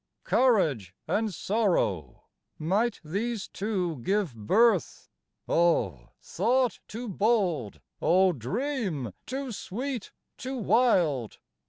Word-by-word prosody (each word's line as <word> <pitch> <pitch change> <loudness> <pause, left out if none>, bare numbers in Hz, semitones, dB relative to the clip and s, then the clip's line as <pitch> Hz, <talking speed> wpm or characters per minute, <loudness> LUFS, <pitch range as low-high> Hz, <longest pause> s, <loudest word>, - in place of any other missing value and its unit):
Courage 150 - +2
and 220 0 0
sorrow: 175 - 0 0.3
might 200 +9 0
these 205 +7 -3
two 190 -6 -2
give 190 - 0
birth? 195 - +2 0.4
O 110 - +1
thought 245 +6 +1
too 235 +3 -6
bold, 185 - 0 0.2
O 185 +1 +4
dream 180 - -3
too 265 0 -4
sweet, 240 +3 -5 0.3
too 260 +1 -4
wild? 185 - +2
195 Hz, 90 wpm, -28 LUFS, 150-235 Hz, 0.4 s, O